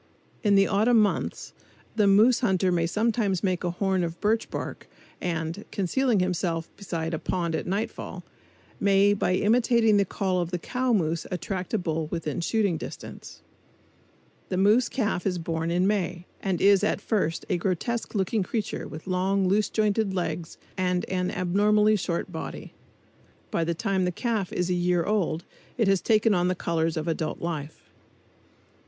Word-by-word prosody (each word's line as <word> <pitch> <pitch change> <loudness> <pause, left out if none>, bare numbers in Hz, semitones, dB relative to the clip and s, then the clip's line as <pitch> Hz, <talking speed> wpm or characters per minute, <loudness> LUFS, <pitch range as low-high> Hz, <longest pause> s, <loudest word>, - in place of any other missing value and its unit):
In 205 -3 +3
the 195 0 +6
autumn 220 +4 +3
months 210 -1 -1 0.4
the 210 -2 +3
moose 215 +5 +5
hunter 190 -6 +2
may 170 -1 +1
sometimes 210 -1 0
make 185 -2 0
a 175 - 0
horn 190 +1 0
of 170 0 -4
birch 220 +2 +1
bark - - -6 0.3
and, 165 +2 -3
concealing 220 +4 +1
himself 170 -2 -2
beside 165 -5 -4
a 160 - -1
pond 170 -3 -2
at - - -2
nightfall, 200 +5 -3 0.6
may 200 0 +4
by 185 -2 +1
imitating 225 +1 +3
the 200 - +4
call 185 -1 -1
of 170 - -3
the 180 - -2
cow 250 +8 -1
moose 165 -6 0
attract 180 +1 -4
a - - +3
bull 160 -4 -2
within 165 0 -3
shooting 200 -2 +1
distance. - - -9 1.1
The 185 - -1
moose 215 +6 +4
calf 210 -7 -1
is 180 -2 0
born 165 -1 -2
in 175 +2 +2
May 180 -4 -1 0.2
and 190 -3 -1
is 200 -1 +5
at - - +1
first 190 -7 -1
a 185 - +1
grotesque 200 +7 -2
looking 200 +2 +1
creature 210 +3 -3
with 155 - -9
long, 190 +1 +1
loose 205 +3 +2
jointed 210 -2 +1
legs 175 -2 -3 0.2
and 180 -1 +1
an 180 -1 0
abnormally 210 +4 +3
short 175 -3 -2
body. 160 - -7 0.8
By 165 - +1
the 170 +1 -1
time 190 0 0
the 180 - 0
calf 215 0 -2
is 180 - -1
a - - +3
year 175 -1 +1
old 180 -5 0 0.3
it 225 -4 +2
has 195 -1 +3
taken 220 -1 +3
on 175 -1 +2
the 185 - +1
colors 165 -2 -1
of 155 - -3
adult 160 -1 -2
life. 160 -3 -5
185 Hz, 170 wpm, -26 LUFS, 170-210 Hz, 1.1 s, the